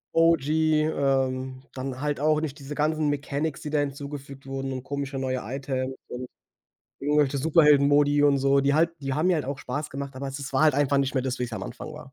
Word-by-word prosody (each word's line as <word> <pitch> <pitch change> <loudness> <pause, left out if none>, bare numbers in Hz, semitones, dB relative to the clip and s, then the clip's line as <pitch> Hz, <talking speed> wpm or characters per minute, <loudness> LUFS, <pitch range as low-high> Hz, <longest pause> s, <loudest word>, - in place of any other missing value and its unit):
OG, 165 -3 +4 0.3
ähm, 130 -3 0
dann 130 0 -5
halt 145 -2 -1
auch 155 +1 +2
nicht 145 -2 -4
diese 140 +2 -7
ganzen 155 +1 +1
Mechanics, 145 +1 -2
die 150 - -5
da 150 - +1
hinzugefügt 140 -1 -5
wurden 135 0 -4
und 130 - -5
komische 140 0 -4
neue 130 -1 -1
Items 130 +1 -3
und 125 0 -6 0.7
irgendwelche 145 -1 +2
Superhelden-Modi 145 -1 +4
und 140 -1 +4
so. 140 +1 +3
Die 140 +1 +2
halt 165 +2 +3
die 135 -1 -3
haben 155 +5 +1
mir 180 - +4
halt 155 - -2
auch 140 0 -4
Spaß 145 +5 -4
gemacht, 140 0 -6
aber 135 +1 -5
es 135 +1 -6
es 140 0 -6
war 135 - +2
halt 150 -3 +5
einfach 140 -1 +2
nicht 140 +1 0
mehr 130 - +1
das, 130 -1 -2
wie's 120 -2 -3
am - - -4
Anfang 155 - -8
war. 145 -3 -11
140 Hz, 220 wpm, -26 LUFS, 135-150 Hz, 0.7 s, halt